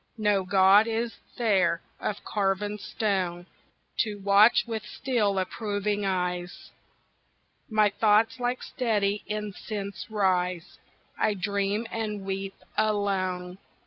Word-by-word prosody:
No 210 -3 +2
god 195 +3 +5
is 230 +1 -1 0.2
there 190 -8 +2 0.2
of 205 - -3
carven 205 +1 -1
stone 185 -5 -2 0.5
To 215 -3 +1
watch 200 +3 +5
with 225 -2 -3
still 215 -4 -1
approving 205 +1 -1
eyes 180 -1 -3 1.0
My 215 -2 +3
thoughts 220 +3 +3
like 245 +1 -1
steady 210 -5 0
incense 205 -2 -5
rise; 180 -4 0 0.4
I 210 - +2
dream 200 +3 -1
and 210 -3 -3
weep 195 0 -4 0.2
alone. 190 -3 -1
205 Hz, 105 wpm, -27 LUFS, 190-215 Hz, 1.0 s, god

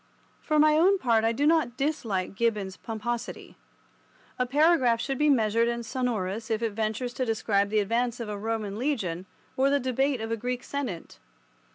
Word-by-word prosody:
For 305 - 0
my 305 0 +5
own 385 +4 +5
part 230 -8 +2
I 225 - +3
do 280 +5 0
not 305 -6 +2
dislike 230 -12 -1
Gibbon's 205 -3 -1
pomposity. 230 +3 -5 0.8
A 250 - +1
paragraph 270 -4 +3
should 270 +2 -3
be 300 0 +4
measured 230 -3 +3
and 235 0 -2
sonorous 225 -4 -2
if 225 0 -1
it 225 - 0
ventures 220 +3 -2
to 260 - -2
describe 210 -3 +1
the 215 - 0
advance 235 +4 -1
of 230 - -4
a 210 - -4
Roman 215 -1 -3
legion, 195 - -2 0.3
or 270 +1 +3
the 285 0 +2
debate 265 +1 0
of 225 +1 -4
a 230 - 0
Greek 250 +2 -3
Senate. 265 -12 -5
235 Hz, 180 wpm, -27 LUFS, 215-270 Hz, 0.8 s, my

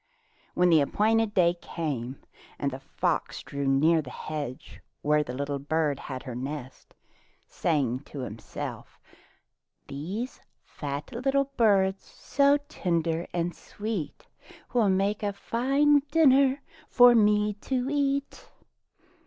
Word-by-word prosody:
When 180 0 +4
the 160 -2 +6
appointed 215 +7 +1
day 175 -2 +4
came 135 -6 -4 0.4
the 140 -2 -2
fox 135 - -2
drew 140 -1 -4
near 155 +5 +4
the 135 - -10
hedge 145 -2 -6 0.2
where 150 +1 +3
the 125 -4 -5
little 140 +1 -3
bird 145 0 0
had 130 -2 -6
her 130 - -6
nest, 130 +1 -7 0.5
saying 135 -7 0
to 140 - -7
himself, 115 -3 -7 0.9
"These 190 - -5 0.2
fat 145 - -6
little 270 +3 0
birds, 195 -4 +3
so 280 0 +2
tender 170 -1 -1
and 175 -1 -2
sweet. 205 -9 -5 0.5
Will 230 -5 +3
make 195 +2 +1
a 205 -1 -1
fine 275 +8 +2
dinner 275 -3 +4 0.3
for 245 -1 +7
me 210 -2 +3 0.2
to 255 -1 0
eat." 280 -1 -1
175 Hz, 120 wpm, -27 LUFS, 140-235 Hz, 0.9 s, for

